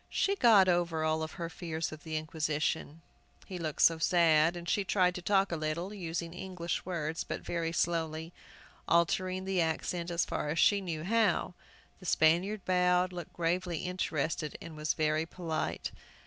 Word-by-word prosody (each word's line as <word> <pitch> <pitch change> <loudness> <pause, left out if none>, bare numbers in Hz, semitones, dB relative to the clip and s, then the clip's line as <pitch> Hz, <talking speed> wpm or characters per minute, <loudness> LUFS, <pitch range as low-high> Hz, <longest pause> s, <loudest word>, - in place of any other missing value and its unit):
She 395 - +1
got 220 - +6
over 175 -3 +1
all 160 0 0
fears 165 -1 -4
of 155 -1 -10
the 160 -1 -3
Inquisition, 155 0 -2 0.4
he 185 -2 -6
looked 155 -3 -1
so 165 -1 +5
sad, 165 -1 +4
and 170 0 -8
she 205 - +1
tried 180 -1 +2
to 180 - -6
talk 195 +1 +2
a - - 0
little, 160 +5 -3
using 170 -3 -4
English 180 -2 -4
words, 165 -3 -2
but - - -5
very 165 -1 -2
slowly, 165 -2 -1
and 165 - -11 0.6
altering 185 +2 +1
the 190 -2 +1
accent 170 +2 -2
as 170 -1 +1
far 150 - -3
as 155 - -2
she 200 +4 +4
knew 165 -4 -4
how. 205 -3 +2 0.5
The 185 - -9
Spaniard 180 +7 +2
bowed, 180 0 +2
looked 175 -3 -7
gravely 175 0 -1
interested, 165 -4 -2
and 165 -2 -9
was 150 -1 -1
very 155 +1 +1
polite. 165 -3 -3
170 Hz, 165 wpm, -31 LUFS, 160-180 Hz, 0.6 s, got